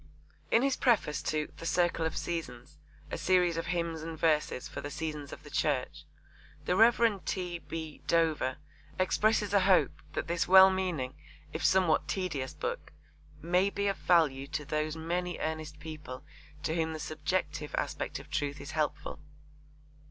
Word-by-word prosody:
In 230 - +4
his 275 -1 +2
preface 200 - +2
to 155 -1 -2
The - - -8
Circle 175 -2 +2
of 160 - -5
Seasons, 150 -4 -5 0.3
a - - -3
series 180 -2 +3
of 165 - -3
hymns 170 -2 -1
and 160 0 -6
verses 150 -5 +1
for - - -6
the 145 - -5
seasons 150 -2 -5
of - - -9
the - - -12
Church, - - -1 0.6
the 180 - +1
Rev. 225 -1 +4
T. 180 -2 -3
B. 160 -2 -7
Dover 160 -6 +2 0.4
expresses 210 +2 +2
a 200 - +6
hope 190 -1 +3
that - - -2
this 170 0 0
well 190 +1 +9
meaning 175 -9 -2 0.4
if - - -4
somewhat 170 -5 +3
tedious 150 -5 -2
book 475 +1 -4 0.5
'may 180 +4 +3
be 200 0 -2
of 195 - 0
value 145 -6 +3
to 150 0 -4
those 155 +2 -1
many 175 +2 -2
earnest 155 -1 -4
people 150 -4 -8 0.4
to 155 - 0
whom 160 -1 0
the 155 - -5
subjective 155 0 -2
aspect - - -2
of - - -11
truth 145 0 -1
is 140 +3 -7
helpful.' 155 -2 -2
165 Hz, 160 wpm, -31 LUFS, 150-185 Hz, 0.6 s, well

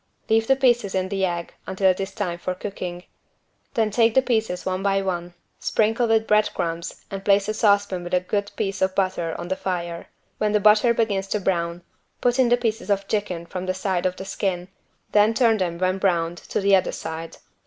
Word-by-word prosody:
Leave 225 0 +3
the 270 - +5
pieces 240 -7 +2
in 185 0 0
the 195 -1 -1
egg 175 -2 -2
until 190 0 +3
it 185 - -5
is 195 0 -3
time 180 -3 -3
for 185 +1 -3
cooking. 180 -2 -6 0.7
Then 220 -2 +2
take 225 +1 +3
the 265 - +5
pieces 220 -7 -1
one 185 0 -1
by 195 0 +1
one, 175 -2 -3 0.2
sprinkle 225 +2 +1
with 225 -1 +3
bread 210 0 +3
crumbs 170 0 -4
and 195 0 -5
place 200 0 +3
a 215 - 0
saucepan 200 -4 +2
with 175 +1 -1
a - - +4
good 200 +3 -2
piece 195 0 -2
of 190 0 +1
butter 185 -4 0
on 175 - -6
the 190 - 0
fire. 175 -3 -4 0.3
When 210 0 +1
the 210 - +4
butter 215 +3 +5
begins 200 -4 0
to 210 - -1
brown 170 -2 -1 0.4
put 245 +1 +1
in 250 -2 +4
the 245 - +4
pieces 225 -2 -2
of 200 -1 +1
chicken 185 -5 -2
from 185 +2 -6
the 185 - 0
side 185 -1 0
of 180 - -3
the 190 - -7
skin, 185 -2 -2 0.4
then 210 +2 +4
turn 230 -3 +4
them 175 -3 -2
when 185 +1 0
browned 175 -3 0
to - - 0
the 200 0 +5
other 185 - +1
side. 160 +1 -6
195 Hz, 215 wpm, -23 LUFS, 180-215 Hz, 0.7 s, the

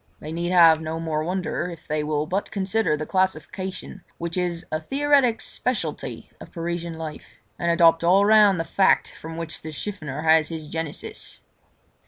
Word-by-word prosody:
They 155 - -7
need 170 +1 -2
have 165 -3 +6
no 160 +1 -4
more 155 -2 -2
wonder 180 0 -2
if 170 -2 -11
they 150 0 -1
will 150 0 -1
but 190 +5 -2
consider 195 -4 0
the 155 - -4
classification 185 +1 -2
which 170 0 -4
is 175 -2 -2
a 155 0 -1
theoretic 275 - +2
speciality 250 -2 -3
of - - -12
Parisian 170 -1 -4
life, 160 -2 -8 0.2
and 170 - 0
adopt 170 -1 +5
all 190 +4 +5
round 210 -3 +6
the - - 0
fact 190 +3 +2
from 160 +1 -9
which 165 -1 -5
the 155 - -7
chiffonier 155 -4 -5
has 160 -1 +4
his 160 -2 -6
genesis. 160 -1 -6
170 Hz, 170 wpm, -24 LUFS, 160-190 Hz, 0.2 s, have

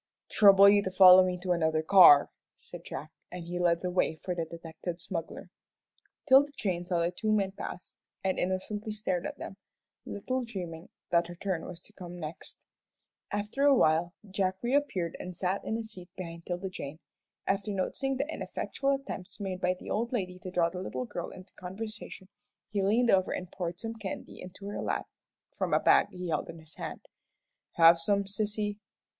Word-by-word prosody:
"Trouble 200 -1 +8
you 205 0 +6
to 190 - -2
follow 185 0 +9
me 180 -1 -1
to 185 - -1
another 160 -2 +1
car," 165 -5 +8 0.3
said - - -11
Jack, - - -7 0.2
and 180 -1 -6
he 175 +1 -4
led 170 -1 +2
the 180 - -1
way 180 -3 +1
for 180 +3 -4
the 170 -2 -2
detected 165 +1 -7
smuggler. 165 -1 -6 0.7
'Tilda 285 +1 +6
Jane 180 -4 -1
saw 175 -2 +1
the 170 +1 +1
two 215 +4 -2
men 200 -3 +2
pass, 185 -2 -8 0.3
and 190 -1 0
innocently 205 +4 -2
stared 190 -4 -2
at - - -8
them, 195 - -8 0.5
little 255 +5 -2
dreaming 180 -7 -7 0.2
that 170 -1 +3
her 175 - -8
turn 180 -2 -3
was 175 -2 -8
to 210 - -14
come 180 -3 -9
next. 155 0 -8 0.7
After 210 +6 -2
awhile 175 - +4
Jack 190 -1 0
reappeared 240 - 0
and 180 -1 -7
sat 185 +3 -1
down - - -4
in - - 0
a 230 - -4
seat 190 -5 -11
behind 170 -2 -8
'Tilda 180 +2 -3
Jane. 150 -4 -7 0.5
After 195 +1 -1
noticing 265 +8 -1
the 280 +3 -1
ineffectual 275 -3 -2
attempts 270 -9 -7
made 190 -2 -4
by 180 0 +2
the - - -8
old 235 +3 -1
lady 185 -7 -3
to 185 - -7
draw 175 -2 +1
the 180 0 -5
little 130 -8 -4
girl 170 +7 -5
into 185 0 -13
conversation, 195 +1 -7 0.4
he 205 -1 0
leaned 230 +5 +3
over 185 -1 +3
and 180 0 -5
poured 175 -2 -4
some 225 0 -4
candy 210 -4 -7
into 185 +2 -10
her 205 - -4
lap - - -2 0.5
from - - +1
a - - +4
bag - - +5
he 180 -1 -6
held 160 - -1
in - - -8
his 160 -1 -15
hand. - - -6 0.7
"Have 165 0 +7
some, 200 +4 +1
sissy?" 205 +1 -2
185 Hz, 185 wpm, -30 LUFS, 175-205 Hz, 0.7 s, follow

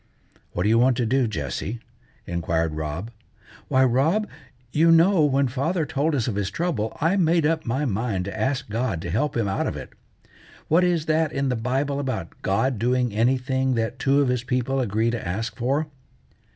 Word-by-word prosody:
"What 90 - -1
do 105 - +2
you 115 +1 +4
want 125 0 +3
to 120 - +1
do, 130 +2 +2
Jessie?" 95 - -4 0.5
inquired 85 -2 -1
Rob. 80 +8 -4 0.6
"Why, 130 0 +3
Rob, 150 - +2 0.4
you 165 +2 +4
know 165 +1 +5
when 140 -1 +2
father 150 +7 -1
told 150 +1 0
us 120 -5 0
of 120 - -1
his 100 -1 -1
trouble, 145 -11 -2
I 165 +6 +2
made 165 -3 +3
up 160 -2 0
my 130 +6 0
mind 105 -5 -1
to 100 - -5
ask 130 +4 -1
God 110 -5 -2
to 85 - -4
help 140 - 0
him 115 -3 +1
out 95 - -1
of - - -3
it. - - -9 0.8
What 170 +4 +4
is 175 -3 +1
that 160 0 +1
in 135 -2 -1
the 125 - 0
Bible 135 +5 -1
about 125 -11 -3
God 115 +5 0
doing 125 0 +1
anything 130 +3 +1
that 115 -1 -2
two 140 +1 +3
of 135 - +1
his 125 -1 0
people 130 +1 -1
agree 115 -1 +1
to 115 -6 -4
ask 110 +7 -3
for?" 135 +5 0
125 Hz, 190 wpm, -24 LUFS, 110-145 Hz, 0.8 s, know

